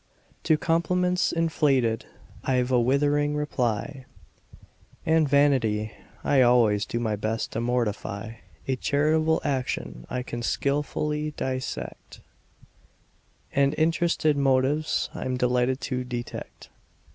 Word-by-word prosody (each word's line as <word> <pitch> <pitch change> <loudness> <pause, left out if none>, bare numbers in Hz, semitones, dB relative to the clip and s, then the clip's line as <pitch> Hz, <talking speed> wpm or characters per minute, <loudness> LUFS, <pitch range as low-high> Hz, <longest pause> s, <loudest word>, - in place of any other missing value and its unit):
To 155 -1 +4
compliments 180 +3 +1
inflated 140 -9 +1 0.4
I've 125 -1 +1
a 125 - +4
withering 145 +3 +2
reply; 130 -2 -2 1.0
And 160 -2 +3
vanity 125 -7 +2 0.3
I 140 -2 +4
always 115 -4 +4
do 115 - -2
my 110 -3 -1
best 110 +2 -2
to 115 - -2
mortify; 115 -2 -2 0.3
A 130 -1 0
charitable 155 +4 +2
action 130 - -3
I 125 0 -3
can 120 -1 -5
skilfully 150 +3 -1
dissect: 130 - -5 1.3
And 140 +1 +2
interested 160 -1 +2
motives 140 +3 +1
I'm 130 -1 -3
delighted 125 +1 +1
to 125 -1 -2
detect. 120 -1 -7
130 Hz, 105 wpm, -26 LUFS, 120-150 Hz, 1.3 s, To